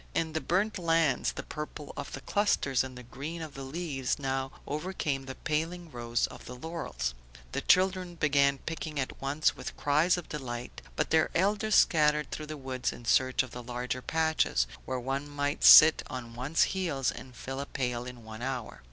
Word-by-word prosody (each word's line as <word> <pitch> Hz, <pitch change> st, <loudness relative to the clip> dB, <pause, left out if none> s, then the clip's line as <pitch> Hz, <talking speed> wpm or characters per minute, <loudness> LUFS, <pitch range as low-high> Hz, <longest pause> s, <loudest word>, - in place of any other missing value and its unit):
In 160 Hz, -1 st, 0 dB
the 160 Hz, -, -1 dB
burnt 200 Hz, +4 st, 0 dB
lands 165 Hz, -6 st, +2 dB
the -, -, -6 dB
purple 150 Hz, -1 st, -7 dB
of 145 Hz, -, -6 dB
the -, -, -6 dB
clusters 140 Hz, -11 st, +1 dB
and 130 Hz, -1 st, -8 dB
the 125 Hz, -, -9 dB
green 140 Hz, +8 st, -6 dB
of 160 Hz, -3 st, -7 dB
the 135 Hz, -, -8 dB
leaves 135 Hz, -2 st, -2 dB
now 135 Hz, -1 st, -2 dB
overcame 150 Hz, -4 st, -3 dB
the 130 Hz, -, -6 dB
paling 165 Hz, +2 st, -2 dB
rose 120 Hz, -1 st, 0 dB
of -, -, -10 dB
the 125 Hz, -, -8 dB
laurels. 125 Hz, -, -4 dB, 0.4 s
The -, -, -2 dB
children 185 Hz, -1 st, +3 dB
began 140 Hz, -3 st, +3 dB
picking 160 Hz, 0 st, -5 dB
at 130 Hz, -, -4 dB
once 145 Hz, +3 st, +1 dB
with -, -, -7 dB
cries 155 Hz, +5 st, +3 dB
of 175 Hz, -, -6 dB
delight, 125 Hz, -4 st, -6 dB
but 150 Hz, -, -1 dB
their 160 Hz, -1 st, +4 dB
elders 205 Hz, +4 st, +2 dB
scattered 150 Hz, -2 st, +4 dB
through 155 Hz, -, -5 dB
the 155 Hz, 0 st, -6 dB
woods 130 Hz, -2 st, -2 dB
in 120 Hz, -, -11 dB
search 130 Hz, +2 st, +3 dB
of 130 Hz, -, -10 dB
the 125 Hz, -, -7 dB
larger 125 Hz, +1 st, -4 dB
patches, 160 Hz, -, +1 dB, 0.2 s
where 130 Hz, -1 st, -2 dB
one 135 Hz, +3 st, -3 dB
might 145 Hz, 0 st, -2 dB
sit 155 Hz, +1 st, +10 dB
on 120 Hz, -2 st, -6 dB
one's 135 Hz, +7 st, +2 dB
heels 160 Hz, -9 st, 0 dB
and 130 Hz, -2 st, -10 dB
fill 135 Hz, +3 st, -6 dB
a 140 Hz, -, -4 dB
pail 125 Hz, -2 st, -2 dB
in 125 Hz, 0 st, -8 dB
an 110 Hz, +1 st, -8 dB
hour. 125 Hz, -2 st, -4 dB
145 Hz, 190 wpm, -30 LUFS, 130-160 Hz, 0.4 s, sit